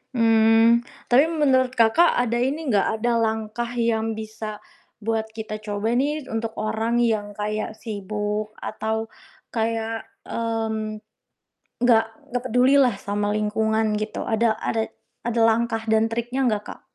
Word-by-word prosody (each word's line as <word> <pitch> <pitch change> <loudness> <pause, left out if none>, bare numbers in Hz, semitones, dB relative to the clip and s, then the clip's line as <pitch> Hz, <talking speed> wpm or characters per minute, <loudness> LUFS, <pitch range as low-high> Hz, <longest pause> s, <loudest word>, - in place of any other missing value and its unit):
Hmm, 225 0 +5 0.3
tapi 270 +6 +6
menurut 265 -5 +2
Kakak, 235 +10 +4
ada 240 -1 +1
ini 275 +2 -1
nggak, 200 -2 +3
ada 240 +1 +2
langkah 220 +1 -1
yang 225 -2 0
bisa 215 -1 -7 0.4
buat 225 0 -1
kita 215 -1 -5
coba 210 +2 -2
nih 295 +2 0
untuk 225 0 -3
orang 220 +2 -1
yang 205 -3 0
kayak 215 +1 -3
sibuk 210 0 -4
atau 220 +1 -3 0.4
kayak, 225 0 -2 0.2
mmm, 220 -2 -3 0.8
nggak 235 -2 +5 0.3
nggak 245 0 -1
peduli 250 +4 +4
lah 245 -6 +3
sama 205 +1 -2
lingkungan 220 +1 +1
gitu, 215 - -4
ada 220 0 +2
ada 225 -1 -1 0.3
ada 235 0 -1
langkah 225 0 +1
dan 220 0 +3
triknya 240 +3 -2
enggak, 210 -1 -1
Kak? - - -20
225 Hz, 135 wpm, -23 LUFS, 215-235 Hz, 0.8 s, tapi